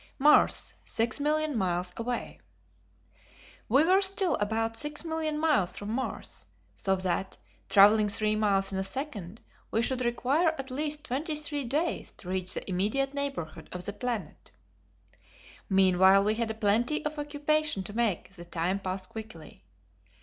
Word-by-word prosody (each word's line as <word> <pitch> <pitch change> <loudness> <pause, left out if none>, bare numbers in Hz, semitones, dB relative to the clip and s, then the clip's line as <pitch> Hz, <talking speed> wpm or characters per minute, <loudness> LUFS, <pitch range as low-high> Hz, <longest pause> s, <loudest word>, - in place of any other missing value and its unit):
Mars 295 +2 +4
6,000,000 295 +7 0
Miles 180 -4 -1
Away. 240 +1 -4 1.3
We 270 +7 +5
were 375 +3 +4
still 385 -1 +2
about 225 +2 -1
6,000,000 310 +3 -1
miles 295 - +1
from 205 +1 -5
Mars, 260 +3 -3 0.3
so 190 -1 0
that, 185 0 -2 0.3
travelling 210 +1 +6
three 215 +1 +1
miles 195 -2 +1
in 190 - -1
a - - 0
second, 210 - -6 0.3
we 225 - +1
should 255 0 -1
require 275 +8 +1
at 265 -1 -6
least 300 +2 -2
twenty 300 +3 -2
three 295 -2 -2
days 300 +8 -1
to 180 - -10
reach 185 0 0
the - - -5
immediate 215 +9 0
neighborhood 275 - -4
of 180 0 -6
the 205 - -4
planet. 235 -2 -5 1.2
Meanwhile 190 0 +5
we 210 +1 +2
had 230 0 -2
a 220 - -3
plenty 230 +8 +1
of 300 0 -3
occupation 295 -5 0
to 205 - -7
make 225 -7 0
the 175 -3 -10
time 175 +3 -1
pass 185 0 -3
quickly. 185 - -10
225 Hz, 145 wpm, -29 LUFS, 195-295 Hz, 1.3 s, travelling